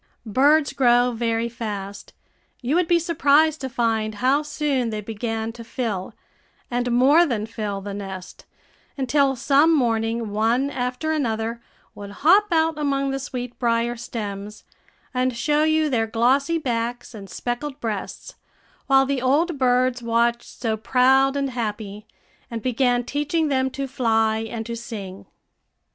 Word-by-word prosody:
Birds 285 +7 +3
grow 245 -1 +4
very 230 0 -1
fast; 205 -4 -6 0.5
you 255 +3 -2
would 350 0 +2
be 345 - +4
surprised 315 -2 +3
to 265 - -3
find 225 -3 -1
how 260 +6 +2
soon 295 -5 -1
they 215 -1 -3
began 225 +1 -4
to 230 0 -10
fill, 225 -6 -4 0.6
and 245 0 -1
more 270 +8 +5
than 235 -10 -1
fill, 210 -3 -4
the 200 0 -6
nest, 190 -2 -8 0.5
until 270 +1 +2
some 285 +5 +4
morning 230 -5 0
one 230 +6 +1
after 250 +4 -2
another 230 -5 -2 0.3
would 200 -1 -9
hop 345 - +4
out 320 -1 +2
among 275 -2 0
the 270 - -2
sweetbrier 240 -3 -2
stems, 210 -4 -6 0.5
and 255 -1 0
show 295 +4 +1
you 315 0 +2
their 230 -5 0
glossy 265 +8 +2
backs 240 -4 -3
and 200 -3 -10
speckled 265 +7 -4
breasts, 215 -6 -5 0.5
while 270 -1 +5
the 270 -1 -1
old 290 +4 +1
birds 250 -1 +2
watched 235 0 0
so 225 -3 0
proud 265 +4 +3
and 275 -1 -1
happy, 215 -3 -5 0.4
and 230 -2 -5
began 245 -1 +1
teaching 295 +4 -1
them 265 -1 +1
to 275 +1 -4
fly 225 -4 +1
and 225 0 -5
to 235 0 -4
sing. 205 -5 -8
245 Hz, 145 wpm, -23 LUFS, 225-275 Hz, 0.6 s, more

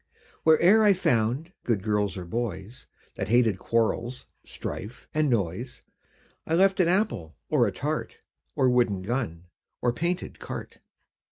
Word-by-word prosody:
Where 160 -1 +5
e'er 210 +5 +7
I 205 -1 +6
found 130 - 0
good 110 -6 0
girls 105 -3 0
or 90 - -6
boys, 110 +2 -5 0.3
That - - -2
hated 115 -3 +3
quarrels, 115 +3 -1 0.2
strife 110 +5 -7
and 155 -1 +2
noise, 115 +2 -2 0.6
I 160 - +1
left 190 +2 +4
an 180 - +4
apple, 170 - 0 0.2
or - - +4
a - - -1
tart, - - -3 0.4
Or 130 - +3
wooden 120 -7 +2
gun, 100 -7 -3 0.3
or 120 -1 +1
painted 175 +7 -3
cart. - - -7
120 Hz, 145 wpm, -27 LUFS, 105-155 Hz, 0.6 s, e'er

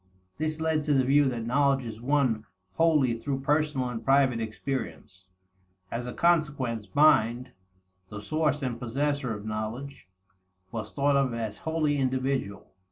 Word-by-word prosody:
This 155 0 -2
led 160 -1 +1
to 150 -2 +2
the 130 - +4
view 145 +2 +4
that 120 -4 -2
knowledge 135 +1 +2
is 110 -1 -7
won 130 -5 +1 0.3
wholly 150 - +3
through 135 +1 -3
personal 150 -2 +1
and 115 -2 -5
private 135 -2 +3
experiences. 110 -5 -5 0.6
As 120 +1 -3
a 125 - -5
consequence, 145 -10 +1
mind, 125 -5 +4 0.6
the 105 - -7
source 150 +5 -1
and 120 -3 -3
possessor 135 +1 -1
of 105 0 -9
knowledge, 110 +5 -5 0.6
was 110 -2 -5
thought 140 0 +1
of 135 -4 +1
as 110 -3 -4
wholly 160 -3 0
individual. 130 -5 -2
135 Hz, 145 wpm, -27 LUFS, 115-145 Hz, 0.6 s, the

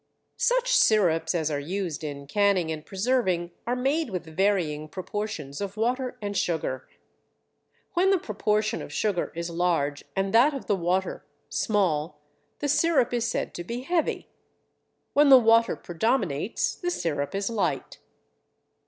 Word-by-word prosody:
Such - - +2
sirups 180 - +3
as 160 -2 0
are 145 - -1
used 170 0 -4
in 140 -2 -5
canning 190 0 +2
and 155 -1 -5
preserving 190 -3 0 0.2
are 245 - +1
made 275 +4 0
with 180 -4 -4
varying 160 -3 0
proportions 185 -5 -5
of 200 +1 -5
water 250 +3 -1
and 205 0 -3
sugar. 160 -8 -2 1.0
When 375 +1 +3
the 390 - +4
proportion 215 - -1
of - - -8
sugar 205 -5 -1
is 170 0 -4
large 165 -5 0
and 195 +1 -1
that 265 +6 +5
of 270 - -6
the 205 - +1
water 185 +1 -1 0.3
small 175 -8 0 0.4
the 290 - -2
sirup 290 -4 +2
is 235 -1 0
said - - -2
to 175 - -5
be 235 +7 -5
heavy. 330 +4 -1 0.9
When 290 0 +5
the 265 - +10
water 230 -1 +4
predominates 180 - -1
the 355 - -3
sirup 155 - -2
is 195 0 -1
light. 225 -3 -2
200 Hz, 145 wpm, -26 LUFS, 165-240 Hz, 1.0 s, the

